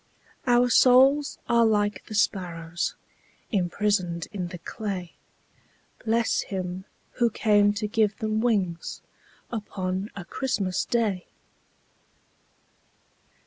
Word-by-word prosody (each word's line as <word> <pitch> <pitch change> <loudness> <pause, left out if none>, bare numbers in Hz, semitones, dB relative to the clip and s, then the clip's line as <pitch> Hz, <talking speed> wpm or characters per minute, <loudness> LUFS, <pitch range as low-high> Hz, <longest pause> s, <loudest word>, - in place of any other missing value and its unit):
Our 245 0 +4
souls 270 +4 +5
are 235 0 +4
like 210 -2 +1
the 215 - -6
sparrows 175 -5 -1 0.6
Imprisoned 185 -3 0
in 190 -4 -3
the 175 0 -7
clay, 185 0 -5 0.9
Bless 230 +1 +1
Him 185 -1 -5 0.3
who 240 -1 +4
came 205 -2 +3
to 210 +1 -3
give 215 -1 +1
them 220 -2 -1
wings 195 -8 -1 0.5
Upon 195 -3 -3
a 190 -3 -7
Christmas 195 -4 -1
Day! 215 -6 0
205 Hz, 100 wpm, -26 LUFS, 185-225 Hz, 0.9 s, souls